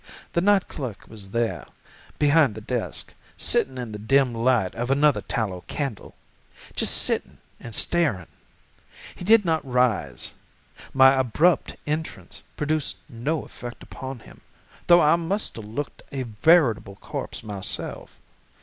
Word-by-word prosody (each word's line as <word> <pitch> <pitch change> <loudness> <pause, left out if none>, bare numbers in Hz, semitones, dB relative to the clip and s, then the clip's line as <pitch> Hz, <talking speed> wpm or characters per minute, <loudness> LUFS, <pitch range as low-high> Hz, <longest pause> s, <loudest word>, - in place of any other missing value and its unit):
The 170 - +2
night 200 0 +4
clerk 125 -9 -6
was 100 -3 -11
there, 115 +2 -1 0.5
behind 145 -5 +4
the - - -6
desk, 120 +2 -3 0.2
sitting 130 - +1
in 120 -3 -5
the 105 - -6
dim 130 +3 +3
light 115 -4 +2
of 120 +2 -3
another 145 +1 +3
tallow 95 -6 -3
candle—just 140 -8 -4
sitting - - -1 0.2
and 115 -2 -6
staring. 150 - +1 0.9
He - - -9
did 215 +1 +5
not 160 -2 +1
rise: 125 - 0 0.6
my 135 0 +7
abrupt 135 +7 +2
entrance 155 +2 -4 0.2
produced 150 0 -1
no 140 +5 -2
effect 120 0 -9
upon 130 -3 -7
him, - - -16 0.5
though 175 0 +8
I 150 +1 +5
must 185 +5 -1
have 110 - -7
looked 120 +8 -5
a 135 -2 -3
veritable 115 - +3
corpse 100 - -5
myself. 100 -3 -3
130 Hz, 130 wpm, -25 LUFS, 110-155 Hz, 0.9 s, though